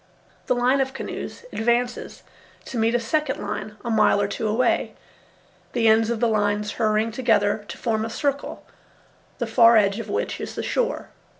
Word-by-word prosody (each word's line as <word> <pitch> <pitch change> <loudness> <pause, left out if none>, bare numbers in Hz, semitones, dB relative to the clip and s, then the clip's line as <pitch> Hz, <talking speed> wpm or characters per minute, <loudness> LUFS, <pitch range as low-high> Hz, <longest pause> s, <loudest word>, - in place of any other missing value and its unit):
The 250 - +2
line 250 +3 +2
of 265 0 -2
canoes 470 - -6
advances 240 +2 -1 0.4
to 245 - -4
meet 225 +2 +2
a - - +3
second 285 +4 -1
line 215 - -5
a 235 - -1
mile 215 -2 +4
or 200 - +1
two 215 +2 -3
away, 230 +3 +1 0.8
the 230 -2 +2
ends 220 0 +4
of 235 -2 -1
the 235 - +2
lines 210 -1 0
hurrying 220 0 0
together 220 -3 +1
to - - -8
form 220 -2 -1
a 225 - -3
circle, 280 +4 -3 0.7
the 240 - -2
far 230 0 +6
edge 200 0 +2
of 230 - -6
which 460 +4 -2
is - - -6
the - - -3
shore. - - -1
230 Hz, 180 wpm, -23 LUFS, 215-250 Hz, 0.8 s, far